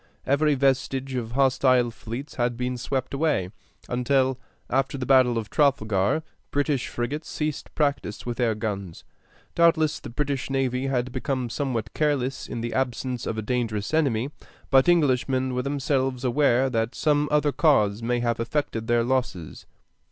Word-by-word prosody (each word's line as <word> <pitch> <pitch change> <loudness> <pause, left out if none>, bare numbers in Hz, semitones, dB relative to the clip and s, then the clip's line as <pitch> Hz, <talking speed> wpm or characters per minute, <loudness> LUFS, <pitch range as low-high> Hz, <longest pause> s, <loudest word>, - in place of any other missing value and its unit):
Every 145 +2 +3
vestige 135 0 0
of 115 -3 -3
hostile 130 -2 +3
fleets 120 +5 -7
had 120 -1 -1
been 125 +1 -2
swept 130 +2 -3
away, 140 - 0 0.4
until, 130 +1 +1 0.3
after 135 +1 0
the 130 - -3
battle 130 -3 +4
of 110 -2 -4
Trafalgar, 110 -2 +2 0.3
British 145 -2 0
frigates 140 +6 -4
ceased 150 -1 -4
practice 140 -8 -1
with 120 -1 -3
their 115 -3 +1
guns. 100 -5 -5 0.5
Doubtless 160 -3 +3
the - - -9
British 140 +2 -2
navy 135 -1 0
had 125 -2 -1
become 130 -1 -2
somewhat 120 -6 -2
careless 135 -4 0
in 120 - -5
the 120 0 -3
absence 125 -1 -2
of 110 - -3
a 110 - -2
dangerous 110 -1 -2
enemy, 135 -4 +1 0.4
but 135 +4 +5
Englishmen 130 -5 +2
were 125 - 0
themselves 135 -2 -1
aware 130 0 +3
that 115 -2 -1
some 150 -1 +1
other 150 0 +3
cause 115 -10 +3
must 120 +1 0
have 115 -1 0
affected 115 -2 -2
their 120 0 +3
losses. 125 -10 -2
130 Hz, 150 wpm, -25 LUFS, 120-140 Hz, 0.5 s, but